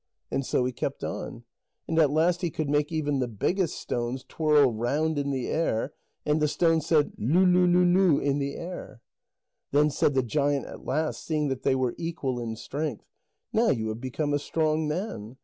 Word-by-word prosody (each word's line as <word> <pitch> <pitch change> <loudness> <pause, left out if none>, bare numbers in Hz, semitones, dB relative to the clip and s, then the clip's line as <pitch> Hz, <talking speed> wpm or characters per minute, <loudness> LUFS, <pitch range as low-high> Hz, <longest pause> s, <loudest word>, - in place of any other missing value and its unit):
And 135 - 0
so 125 - 0
he 130 - 0
kept 120 - -4
on. 120 - -5 0.4
And 165 0 +1
at 155 -3 +5
last 170 +4 +2
he 175 - 0
could 155 -2 -3
make 145 +1 +1
even 145 -3 0
the 125 - 0
biggest 170 - -1
stones 120 +2 -3
twirl 150 -5 +3
round 145 +7 0
in 140 0 -1
the 130 -3 -2
air, 145 -4 -1 0.3
and 150 +1 +1
the 150 - +3
stone 165 +1 +2
said 155 -1 +2
"leu 165 - +3
leu 180 0 +5
leu 175 +1 +4
leu" 175 -3 +4
in 140 0 0
the 140 0 -2
air. 175 -7 -7 0.7
Then 150 +1 +3
said 145 - +1
the 130 - +3
giant 140 +2 0
at - - -10
last, 155 +3 -1
seeing 150 -3 0
that 135 -1 -3
they 135 - +2
were 130 -2 0
equal 160 -7 -3
in 115 -2 -4
strength: 140 +1 -4 0.5
"Now 225 +1 +3
you 110 - 0
have 110 +2 -5
become 145 +3 -2
a 145 - +2
strong 155 +1 0
man. 150 - -4
145 Hz, 200 wpm, -27 LUFS, 130-160 Hz, 0.7 s, at